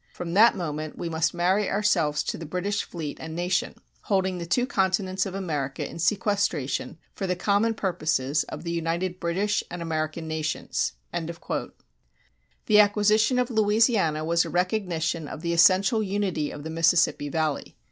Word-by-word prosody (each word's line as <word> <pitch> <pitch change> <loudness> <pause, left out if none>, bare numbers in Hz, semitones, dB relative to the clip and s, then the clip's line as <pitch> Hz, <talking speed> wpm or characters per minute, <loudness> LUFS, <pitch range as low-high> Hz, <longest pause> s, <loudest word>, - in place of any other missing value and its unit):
From 170 -1 -6
that 225 +5 +6
moment 155 -3 -4
we 170 - -4
must 160 -1 +1
marry 185 +4 +1
ourselves 170 -8 +1
to - - -3
the 165 - -7
British 195 +5 -1
fleet 155 -4 -6
and 160 0 -6
nation... 175 +1 -1 0.3
holding 190 -2 0
the 170 - -5
two 245 +8 +2
continents 190 -4 0
of 190 - -6
America 150 -8 -3
in - - -9
sequestration 175 - 0 0.2
for 195 - -4
the 180 - 0
common 205 +5 +1
purposes 155 -7 0
of - - -8
the 170 - -3
united 170 +2 -2
British 195 +5 0
and 175 - -6
American 160 -1 -3
nations.[188:1] 155 - -3 0.9
The 210 -1 +5
acquisition 210 +3 +4
of 250 0 0
Louisiana 210 -7 +2
was 170 +1 +3
a - - -6
recognition 175 -4 -1
of 155 - -8
the 170 0 0
essential 190 +5 +5
unity 195 -7 -1
of 145 - -8
the 160 - -5
Mississippi 165 -2 +2
Valley. 155 -1 -2
175 Hz, 155 wpm, -26 LUFS, 160-200 Hz, 0.9 s, that